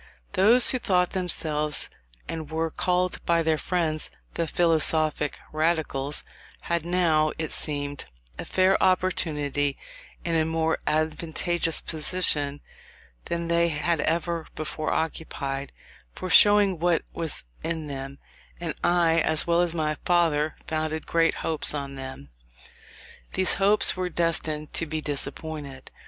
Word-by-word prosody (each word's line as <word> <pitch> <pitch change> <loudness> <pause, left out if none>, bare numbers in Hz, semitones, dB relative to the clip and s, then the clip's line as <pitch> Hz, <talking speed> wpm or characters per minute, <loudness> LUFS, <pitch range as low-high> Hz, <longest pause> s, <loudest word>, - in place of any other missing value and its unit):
Those 220 +6 +6
who 255 - -1
thought 180 -6 +1
themselves, 155 -5 0 0.4
and 160 -2 -5
were 160 0 -2
called 180 +2 -1
by 170 -1 +3
their 160 -1 +1
friends, 160 -4 0 0.2
the 165 - -1
philosophic 155 -3 +1 0.2
Radicals, 155 -3 -1 0.4
had 170 -2 -1
now, 165 -3 +2
it 160 -1 -3
seemed, 145 -2 -3 0.3
a - - -3
fair 190 +1 +2
opportunity, 150 -7 +1 0.5
in 170 - -1
a 160 - +3
more 160 0 0
advantageous 160 +2 0
position 150 -3 0 0.6
than 170 0 -2
they 170 0 +2
had 165 +2 0
ever 165 +1 -1
before 155 0 -3
occupied, 140 -4 -3 0.4
for 185 - -5
showing 205 -4 +6
what 175 0 +2
was 165 -2 -1 0.2
in 160 -1 -3
them; 135 -1 -6 0.4
and 170 -3 -3
I, 170 -2 +3
as 155 -1 +2
well 170 0 +3
as 175 -1 0
my 155 -2 -1
father, 160 -3 +2
founded 155 0 -2
great 165 0 +2
hopes 155 -1 +2
on 140 -1 -4
them. 130 - -8 1.1
These 185 - +4
hopes 205 +2 +5
were 185 -1 -2
destined 160 -3 -1
to 165 - -1
be 155 +1 -3
disappointed. 145 -1 -4
160 Hz, 130 wpm, -26 LUFS, 150-170 Hz, 1.1 s, Those